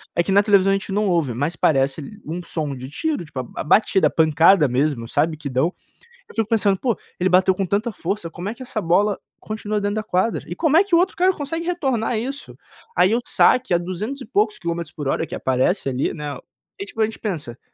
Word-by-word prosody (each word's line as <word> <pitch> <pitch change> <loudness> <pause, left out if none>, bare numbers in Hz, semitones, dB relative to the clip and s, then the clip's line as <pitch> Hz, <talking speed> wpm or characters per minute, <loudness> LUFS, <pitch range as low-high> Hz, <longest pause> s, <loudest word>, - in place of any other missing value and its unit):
é 170 - +3
que 195 - -2
na 200 - +6
televisão 200 -2 +4
a - - +4
gente 195 0 -3
não 205 0 +1
ouve, 165 -8 +1
mas 145 +8 -1
parece 140 +7 0
um 170 +4 -4
som 155 -4 -3
de 130 0 -8
tiro, 295 - -2
tipo, 145 -3 -7 0.2
a - - -2
batida, 190 +4 +3
a - - -1
pancada 160 +1 +4
mesmo, 130 -1 0
sabe? 155 +6 +1
Que 150 -2 -6
dão. 135 +8 +1 0.6
Eu - - -13
fico 225 -2 0
pensando 205 -4 +2
poxa, 240 -6 0 0.2
ele 185 +1 +2
bateu 185 +1 +4
com 195 +1 -2
tanta 210 +6 -1
força, 185 -2 -4
como 175 +2 -6
é - - -4
que 255 - -9
essa 230 -4 -3
bola 195 +4 +2 0.2
continua 215 -1 -3
dentro 205 +1 -1
da 215 - -2
quadra? 210 +2 0
E - - -5
como 320 -2 +3
é 360 - +6
que 395 -4 +1
o - - +6
outro 370 +2 +2
cara 370 +1 +3
consegue 325 +2 -4
retornar 265 -10 0
isso? 270 +5 -5 0.4
Aí, 190 +4 +4
o 235 - +2
saque 255 -6 +3
a - - +5
duzentos 190 +10 -5
e - - -7
poucos 210 -1 +1
quilômetros 170 -2 -4
por 145 -3 -4
hora - - -1
que - - -6
aparece 130 +6 0
ali, 130 +1 -1
né. 150 -2 -5 0.4
E 395 - -4
tipo 225 - -5
a - - +5
gente 220 - -7
pensa, 150 - -5
195 Hz, 235 wpm, -21 LUFS, 160-225 Hz, 0.6 s, na